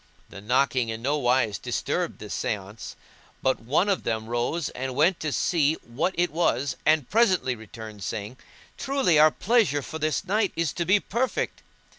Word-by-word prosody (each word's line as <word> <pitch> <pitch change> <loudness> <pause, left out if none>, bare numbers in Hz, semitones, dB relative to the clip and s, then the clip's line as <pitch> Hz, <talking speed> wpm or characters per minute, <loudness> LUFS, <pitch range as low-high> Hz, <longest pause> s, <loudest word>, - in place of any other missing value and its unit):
The 100 - -10
knocking 125 +1 +1
in 110 +1 -5
no 145 +3 +1
wise 125 -5 +1
disturbed - - -2
the - - -9
seance, 100 +2 -4 0.5
but 130 - +2
one 140 - +1
of 200 -2 +1
them 110 -1 -2
rose 120 +8 -1
and 130 0 -5
went 165 +6 +3
to 155 - -2
see 155 0 +2
what 130 +10 -2
it 175 -2 +1
was 140 -5 0
and 155 -4 +3
presently 190 - +2
returned, 110 -2 -10
saying, 105 +5 -5 0.4
"Truly 270 - +2
our 155 +1 +8
pleasure 195 - +1
for 160 - -6
this 155 +5 -1
night 205 +1 +1
is 165 -4 -1
to 170 - -2
be 190 +4 +4
perfect." 235 +6 -2
145 Hz, 170 wpm, -26 LUFS, 120-175 Hz, 0.5 s, our